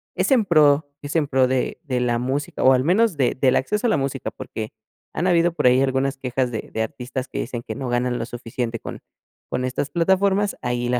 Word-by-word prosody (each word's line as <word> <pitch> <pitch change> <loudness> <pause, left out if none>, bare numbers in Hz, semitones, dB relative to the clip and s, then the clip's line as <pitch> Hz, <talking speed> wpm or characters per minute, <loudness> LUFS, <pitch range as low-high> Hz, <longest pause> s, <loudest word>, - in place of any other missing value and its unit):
es - - 0
en 245 -5 +4
pro, 150 -4 +4
es 145 +2 -6
en 155 -3 +2
pro 130 -2 +3
de 130 0 -1
de 130 -4 -1
la 120 -1 +1
música, 135 +4 -2
o 130 - +7
al 130 0 +2
menos 190 +2 +2
de 130 -3 +2
del 130 -2 +4
acceso 210 - 0
a - - +2
la - - +3
música, 135 -1 -3
porque 110 -1 -7 0.4
han 175 - -1
habido 175 -1 +3
por 150 -5 -2
ahí 125 +1 +5
algunas 135 0 0
quejas 130 -1 -1
de 110 - -5
de 110 - 0
artistas 125 +3 -5
que - - -4
dicen 120 -1 -4
que 110 - -6
no 130 +1 -4
ganan 120 0 0
lo 115 - -2
suficiente 115 -1 -4
con - - -8 0.5
con 125 - -1
estas 130 +2 -2
plataformas. 190 +3 +2
Ahí 120 0 -1
la 125 0 +1
130 Hz, 230 wpm, -22 LUFS, 125-155 Hz, 0.5 s, o